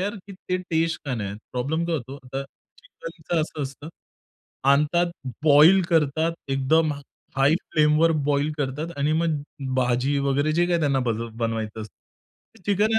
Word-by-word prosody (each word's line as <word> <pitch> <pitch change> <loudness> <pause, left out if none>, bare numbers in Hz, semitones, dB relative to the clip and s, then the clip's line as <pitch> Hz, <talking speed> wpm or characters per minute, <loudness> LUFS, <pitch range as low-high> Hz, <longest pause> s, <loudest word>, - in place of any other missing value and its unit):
यार 205 +2 -2 0.4
ते 185 - +3
टेस्ट 165 0 0
का 135 -3 -2
नाही 105 -4 -4
येत. 100 - -8
प्रॉब्लेम 145 +7 -1
काय 170 - 0
होतो 135 +1 -7 0.2
तर 135 - -1 0.4
चिकनचं 165 - -4
असं 155 -1 -5
असतं 140 +3 -7 0.8
आणतात, 150 +5 +3 0.4
बॉईल 155 +6 +7
करतात. 160 0 +2 0.2
एकदम 145 +4 +2 0.4
हाय 135 +3 +4 0.2
फ्लेमवर 155 +2 +4 0.2
बॉईल 145 +2 +1
करतात 145 +4 -2
आणि 145 +2 +1
मग 155 -3 0 0.3
भाजी 130 +2 +1
वगैरे 145 +3 +1
जे 175 +2 +2
काही 175 -1 +1
त्यांना 140 -3 +2
बल 115 +1 -2
बनवायचं 115 -1 -3
असतं. 110 - -12 0.6
ते - - -25
चिकन 210 +2 +2
आहे - - +5
150 Hz, 155 wpm, -24 LUFS, 135-165 Hz, 0.8 s, बॉईल